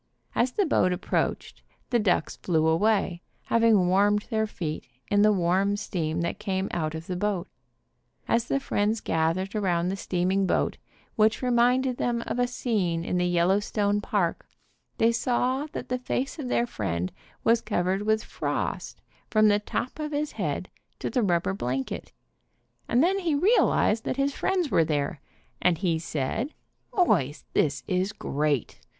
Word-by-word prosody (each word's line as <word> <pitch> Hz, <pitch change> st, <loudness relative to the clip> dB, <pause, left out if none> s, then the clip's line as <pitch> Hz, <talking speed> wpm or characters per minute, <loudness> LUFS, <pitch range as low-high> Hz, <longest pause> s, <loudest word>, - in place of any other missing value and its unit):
As 245 Hz, +1 st, +1 dB
the 405 Hz, -, +2 dB
boats 185 Hz, -, +2 dB
approached, 185 Hz, -, -2 dB, 0.3 s
the 240 Hz, -, +3 dB
ducks 190 Hz, -6 st, +1 dB
flew 160 Hz, -3 st, +1 dB
away, 180 Hz, +1 st, +2 dB, 0.2 s
hav 230 Hz, 0 st, +1 dB
ing 210 Hz, -6 st, +5 dB
warmed 205 Hz, +3 st, +3 dB
their 220 Hz, -1 st, +1 dB
feet 155 Hz, -7 st, -5 dB, 0.2 s
in 205 Hz, 0 st, +4 dB
the 215 Hz, +1 st, +6 dB
warm 190 Hz, +2 st, +2 dB
steam 165 Hz, -5 st, -2 dB
that 170 Hz, +4 st, -2 dB
came 195 Hz, -2 st, -2 dB
out 160 Hz, -2 st, -2 dB
of 160 Hz, +1 st, -6 dB
the 180 Hz, -, -4 dB
boat. 195 Hz, -1 st, -1 dB, 0.8 s
As 230 Hz, 0 st, +2 dB
the 275 Hz, -, 0 dB
friends 215 Hz, -4 st, 0 dB
gathered 165 Hz, +4 st, 0 dB
around 180 Hz, -5 st, +1 dB
the 190 Hz, -, -1 dB
steaming 190 Hz, +1 st, 0 dB
boat, -, -, 0 dB, 0.4 s
which 215 Hz, +3 st, +3 dB
reminded 250 Hz, +1 st, +3 dB
them 235 Hz, -1 st, -1 dB
of 245 Hz, -, -3 dB
a 245 Hz, -, +3 dB
scene 190 Hz, -9 st, -1 dB
in 180 Hz, -, -1 dB
the 180 Hz, -, +2 dB
Yellowstone 200 Hz, +4 st, +1 dB
park, 200 Hz, -5 st, -1 dB, 0.5 s
they 225 Hz, +1 st, +4 dB
saw 255 Hz, +4 st, 0 dB
that -, -, -6 dB
the 255 Hz, 0 st, -1 dB
face 260 Hz, +4 st, -3 dB
of 275 Hz, -, -4 dB
their 240 Hz, -, +2 dB
friend 90 Hz, -, -3 dB, 0.3 s
was 230 Hz, 0 st, +4 dB
covered 190 Hz, -2 st, 0 dB
with 220 Hz, +1 st, +1 dB
frost -, -, -3 dB, 0.3 s
from 215 Hz, -1 st, +5 dB
the 205 Hz, 0 st, +3 dB
top 245 Hz, +6 st, -4 dB
of 305 Hz, 0 st, -3 dB
his 295 Hz, +1 st, -1 dB
head -, -, -3 dB, 0.3 s
to -, -, -4 dB
the 250 Hz, -, +1 dB
rubber 180 Hz, -2 st, +1 dB
blanket, 130 Hz, -6 st, -3 dB, 0.8 s
and 245 Hz, +4 st, +3 dB
then 385 Hz, +3 st, +2 dB
he 335 Hz, -5 st, 0 dB
realized 285 Hz, -, +3 dB
that -, -, -2 dB
his 275 Hz, 0 st, +1 dB
friends 360 Hz, -2 st, 0 dB
were 165 Hz, -, +4 dB
there 145 Hz, -2 st, -2 dB, 0.4 s
and 180 Hz, -2 st, +3 dB
he 170 Hz, -2 st, 0 dB
said, 165 Hz, -, -3 dB, 0.4 s
"Boys, 150 Hz, -, +1 dB
this 140 Hz, -3 st, +1 dB
is 185 Hz, +3 st, 0 dB
great. 145 Hz, -, -1 dB
205 Hz, 165 wpm, -26 LUFS, 175-235 Hz, 0.8 s, the